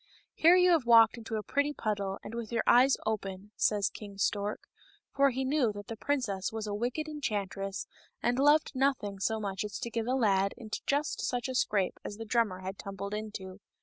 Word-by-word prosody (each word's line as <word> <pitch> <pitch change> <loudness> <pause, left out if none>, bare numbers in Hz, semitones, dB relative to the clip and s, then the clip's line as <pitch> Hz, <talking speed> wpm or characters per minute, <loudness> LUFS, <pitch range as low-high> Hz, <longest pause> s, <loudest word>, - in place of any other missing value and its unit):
" - - -37
Here 335 +3 +6
you 360 0 +5
have 310 -8 +2
walked 230 0 +6
into 225 -1 -5
a 215 - -2
pretty 285 +5 0
puddle, 200 -5 -2
and - - -8
with 235 -1 -5
your 230 - 0
eyes 255 +3 +5
open," 200 -2 -3
says 205 -2 +1
King 205 -2 -10
Stork, 205 +1 -1 0.5
for 275 0 +4
he 265 +1 -2
knew 265 -4 +2
that 205 -1 -9
the 225 - -4
princess 220 -7 -1
was 220 -1 -4
a 205 - -3
wicked 245 +9 -2
enchantress, 200 -9 -3 0.3
and 245 +2 0
loved 295 +2 +4
nothing 255 -7 0
so 220 +3 0
much 195 -2 -3
as 210 -1 -5
to 235 - -5
get 230 0 -2
a 255 - +1
lad 200 -5 +2
into 220 -3 -5
just 290 +2 0
such 245 0 -1
a 260 - -4
scrape 200 -6 0
as 205 - -6
the 225 - -6
drummer 215 -5 0
had 190 +1 -6
tumbled 200 +1 -6
into. 205 -3 -6
220 Hz, 210 wpm, -30 LUFS, 200-260 Hz, 0.5 s, Here